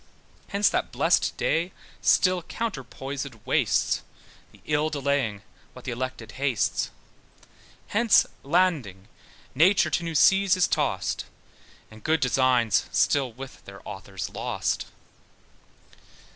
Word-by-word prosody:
Hence 200 +1 +2
that - - -1
blest - - +2
day 170 +3 0 0.3
still 185 -1 +3
counterposèd 135 - -5
wastes, - - +1 0.5
The - - -19
ill 150 +1 +1
delaying 140 -8 -1 0.3
what 125 - -13
the 130 - -3
elected 125 -1 -5
hastes; 135 -5 0 1.0
Hence 225 +1 +4 0.2
landing 135 - 0 0.4
nature 180 +8 +4
to 175 - 0
new 165 -1 -4
seas 195 +4 +5
is 185 - +3
tossed, - - -1 0.7
And 110 0 -14
good 160 +1 +2
designs 125 -3 +2
still 115 +7 +2
with 130 +3 -10
their 100 0 -12
authors 95 -1 -6
lost. - - -2
135 Hz, 110 wpm, -26 LUFS, 115-170 Hz, 1.0 s, seas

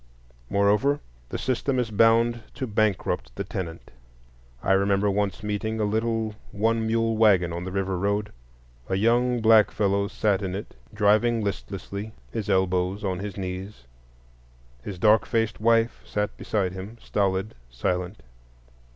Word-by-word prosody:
Moreover, 105 +9 +3 0.3
the - - -3
system 130 +1 -1
is 120 -3 -1
bound 115 +2 +4
to 135 - -3
bankrupt 110 -3 -1
the - - -3
tenant. 85 -3 -6 0.7
I - - +1
remember 100 +1 +3
once 100 0 -1
meeting 105 +2 -2
a - - +1
little 110 +1 0 0.2
one 110 +2 +1
mule 115 0 +1
wagon 95 -6 +4
on 85 +1 -4
the 95 - -5
River 95 0 -1
road. 100 +2 0 0.6
A 95 - +1
young 120 +4 +2
black 110 -1 +6
fellow 100 -1 +1
sat 105 -1 0
in 95 -1 -3
it 100 - -7 0.2
driving 110 +2 +3
listlessly, 100 +1 -5 0.2
his 105 -2 -4
elbows 95 +1 +1
on 95 -3 -1
his 100 0 -6
knees. 95 -4 -6 1.0
His 95 +3 -6
dark 110 +3 +4
faced 115 -3 0
wife 115 +1 +2
sat 105 0 -2
beside 95 -4 -1
him, 95 +5 -8
stolid, 100 0 -1 0.2
silent. 90 - -3
105 Hz, 140 wpm, -25 LUFS, 95-115 Hz, 1.0 s, black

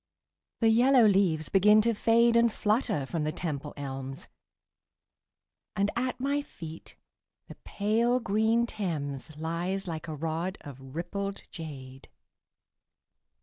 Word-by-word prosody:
The 225 - +5
yellow 245 +2 +5
leaves 190 -6 +2
begin 210 +2 +6
to 230 +1 +2
fade 230 +2 +3
And 235 0 +4
flutter 210 - 0
from 160 +3 -3
the 155 - -1
Temple 150 -3 -4
elms, 135 -1 -6 1.5
And 200 +1 +1
at 250 +1 -2
my 280 +2 0
feet 165 - -10 0.5
the - - -9
pale 230 +4 +1
green 220 +2 +2
Thames 155 - -4
Lies 175 +5 -3
like 160 -1 -5
a 155 - -4
rod 165 +5 -3
of 135 -1 -11
rippled 195 +4 -4
jade. 135 -5 -9
190 Hz, 120 wpm, -29 LUFS, 155-225 Hz, 1.5 s, begin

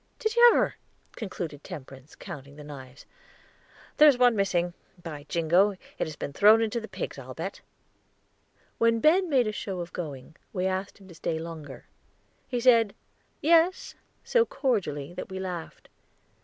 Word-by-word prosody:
Did 440 -2 -2
you 480 0 +9
ever?" - - +1 0.4
concluded 170 -9 -6
Temperance, 135 0 -10
counting 140 0 -9
the 150 - -11
knives. 135 -2 -11 0.9
"There's 295 -4 +7
one 245 -2 +5
missing. 175 -3 0 0.3
By 150 -3 -8
jingo! 175 +5 +3
it 190 - -6
has 155 - -7
been 140 - -6
thrown 220 +6 +6
to 235 +2 -3
the 220 - -7
pigs, - - -6
I'll - - -9
bet." - - -5 1.2
When 230 0 +3
Ben 345 - +4
made 260 -5 +3
a 215 - -1
show 195 -3 -5
of 170 0 -6
going, 150 -3 -7 0.2
we 185 -2 -1
asked 190 +1 -2
him 195 -2 -16
to - - -11
stay 160 0 -3
longer. 160 -4 -8 0.6
He 245 - -2
said 230 -4 +4 0.5
"Yes," 335 +3 +3 0.3
so 475 -2 +3
cordially, 175 - -2
that - - -7
we 190 0 -5
laughed. 180 -3 -6
190 Hz, 155 wpm, -27 LUFS, 155-235 Hz, 1.2 s, you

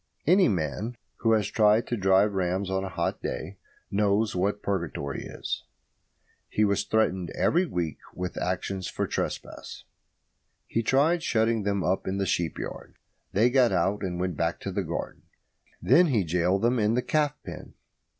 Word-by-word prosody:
Any 185 +4 +5
man 100 +6 -2 0.2
who 115 -1 +2
has 110 -2 +2
tried 105 +1 +3
to 120 - -2
drive 95 0 +3
rams 95 +1 -1
on 95 0 0
a 95 - -4
hot 85 -2 -2
day 90 +5 -5 0.3
knows 105 +1 +2
what 100 +3 0
purgatory 85 -7 -3
is. - - -5 0.9
He 105 - +2
was 100 -1 +1
threatened 95 -5 +1
every 175 +2 +2
week 85 - -3 0.2
with 90 0 -4
actions 95 0 -2
for - - -2
trespass. - - -5 0.8
He 115 - -1
tried 145 +9 +3
shutting 115 -5 +1
them 100 -2 0
up 95 - 0
in 95 +1 -1
the 100 - 0
sheep 85 -2 -1
yard. - - -7 0.4
They 115 +5 +3
got 125 -3 +4
out 95 +3 +1
and 90 -3 -3
went 90 -2 -1
back - - -1
to - - -4
the - - -1
garden. - - -5 0.6
Then 175 +1 +6
he 115 -9 +2
gaoled 90 +4 +1
them 120 +1 +3
in 105 +1 +2
the 125 - +1
calf 150 -1 +1
pen. 85 -4 -9
100 Hz, 170 wpm, -27 LUFS, 90-115 Hz, 0.9 s, Then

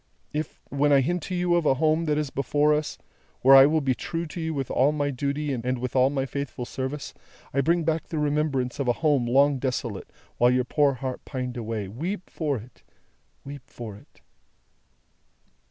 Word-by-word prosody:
If, 155 +1 -4
when 145 +1 +2
I 140 -1 +6
hint 175 +6 -1
to 185 - -2
you 175 0 +1
of 170 -3 +2
a 135 - +4
Home 155 +3 +2
that 150 -1 +1
is 150 -3 -2
before 145 +2 +2
us, 150 0 -2 0.4
where 135 +1 +8
I 135 +1 +9
will 155 +1 +2
be 135 -2 +1
true 165 +6 -4
to 165 +2 -7
you 160 0 -2
with 135 -4 -3
all 135 +3 +3
my 145 -1 -1
duty 140 +2 -2
and 125 +1 -2
with 125 +1 -5
all 130 0 +5
my 135 -1 -1
faithful 135 -2 -5
service, 130 +4 -5 0.4
I 140 - +2
bring 170 +4 +2
back 160 0 -1
the 160 - -4
remembrance 145 -4 0
of 140 - -1
a 120 - +4
Home 140 -6 +3
long 140 +2 +4
desolate, 120 -6 -3 0.3
while 120 - +5
your 125 0 +2
poor 145 +1 +2
heart 130 0 -5
pined 130 -2 -5
away, 110 -4 -4
weep 170 - -5
for 150 -4 -1
it, 115 +2 -13 0.6
weep 140 -1 -9
for 110 -4 -8
it!" 100 - -19
140 Hz, 200 wpm, -26 LUFS, 125-150 Hz, 0.6 s, I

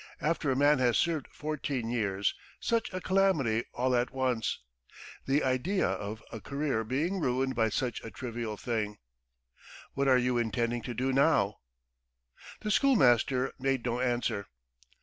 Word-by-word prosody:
After 155 0 0
a 130 - +2
man 145 +1 +4
has 120 -2 +3
served 165 -4 0
fourteen 145 -5 -3
years, 100 -4 0 0.3
such 230 -1 0
a 185 - -3
calamity 180 - +2
all 125 +1 +1
at 120 +1 +1
once! 130 -4 -1 0.7
The 140 +2 +2
idea 135 +10 +1
of 105 +2 -4
a 115 - -7
career 140 -4 -1
being 150 - -1
ruined 130 -2 0
by 115 -2 +2
such 120 +3 -2
a 115 - -6
trivial 115 0 -5
thing. 105 -3 -2 1.0
What 140 0 0
are 130 -1 +6
you 125 -1 +1
intending 120 +1 -1
to 120 - -4
do 130 +3 0
now?" 135 -8 +3 1.0
The 215 - -2
schoolmaster 130 - +3
made 135 -2 0
no 120 0 -1
answer. 120 -5 -1
130 Hz, 150 wpm, -30 LUFS, 115-145 Hz, 1.0 s, are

